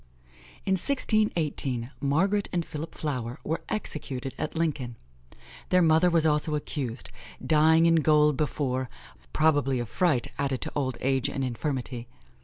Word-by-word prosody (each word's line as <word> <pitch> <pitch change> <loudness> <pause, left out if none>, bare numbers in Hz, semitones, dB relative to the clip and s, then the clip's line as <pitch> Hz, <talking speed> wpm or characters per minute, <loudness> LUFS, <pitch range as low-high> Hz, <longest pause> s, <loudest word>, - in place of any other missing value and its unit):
In 190 - 0
1618, 165 - +1
Margaret 190 +9 +1
and 175 -3 -1
Philip 155 +2 -7
Flower 125 -4 -4
were 160 - -2
executed 135 -9 -2
at 155 - -3
Lincoln; 145 -8 -2 0.7
their 180 -1 +4
mother 160 +2 +4
was 165 -2 +2
also 150 0 +2
accused, 135 -5 -4 0.3
dying 160 +1 +5
in 165 0 +5
goal 150 -1 +4
before 130 -3 -2 0.4
(probably 145 - +2
of 120 -1 -3
fright, 155 - +1
added 135 -2 0
to - - -4
old 130 -3 -2
age 135 +1 +1
and 135 -1 -3
infirmity). 125 -1 -3
150 Hz, 135 wpm, -27 LUFS, 130-160 Hz, 0.7 s, dying